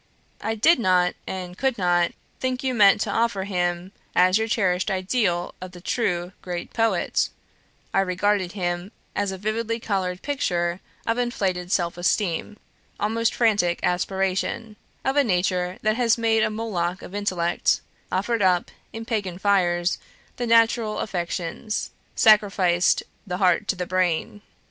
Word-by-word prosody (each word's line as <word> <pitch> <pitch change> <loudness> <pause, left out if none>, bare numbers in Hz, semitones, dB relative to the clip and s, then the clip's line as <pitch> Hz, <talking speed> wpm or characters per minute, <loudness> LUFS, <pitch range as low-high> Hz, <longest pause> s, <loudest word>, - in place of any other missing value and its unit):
I 225 - -1
did 290 +8 +4
not 180 -4 +3
and 180 -1 -5
could 265 +2 0
not 175 -2 +2 0.3
think 255 0 -2
you 260 -1 0
meant 210 -3 +6
to - - -1
offer 230 -4 +1
him 180 -1 -2 0.2
as 185 +3 +5
your 220 - 0
cherished 190 -4 +1
ideal 185 -2 0
of 185 0 -8
the 175 - -10
true, 180 -3 -1
great 175 -1 -5
poet; 225 -6 +1 0.6
I - - +3
regarded 190 0 +1
him 175 0 -3 0.2
as 205 -1 0
a 190 - -5
vividly 225 +3 -2
coloured 190 -5 -2
picture 175 -11 -1 0.3
of 230 +1 0
inflated 185 -7 -1
self 175 -2 0
esteem, 185 +2 0 0.4
almost 225 +2 0
frantic 205 -7 +2
aspiration; 190 +4 -1 0.3
of 265 +2 +1
a 285 - +6
nature 180 -3 0
that 215 +1 +2
has 240 -2 +3
made 225 -1 +2
a - - +2
Moloch 190 -5 -2
of - - -10
intellect 185 -4 0 0.3
offered 205 +4 0
up; 180 -2 +2 0.2
in 225 0 -7
pagan 205 -7 -2
fires, 180 -3 +2 0.4
the 245 - -2
natural 230 -1 +3
affections 180 +3 -3 0.2
sacrificed 195 -5 +4 0.2
the 180 -1 -2
heart 180 -2 +2
to - - +1
the 180 -1 -3
brain. 185 +2 0
190 Hz, 145 wpm, -24 LUFS, 180-225 Hz, 0.6 s, meant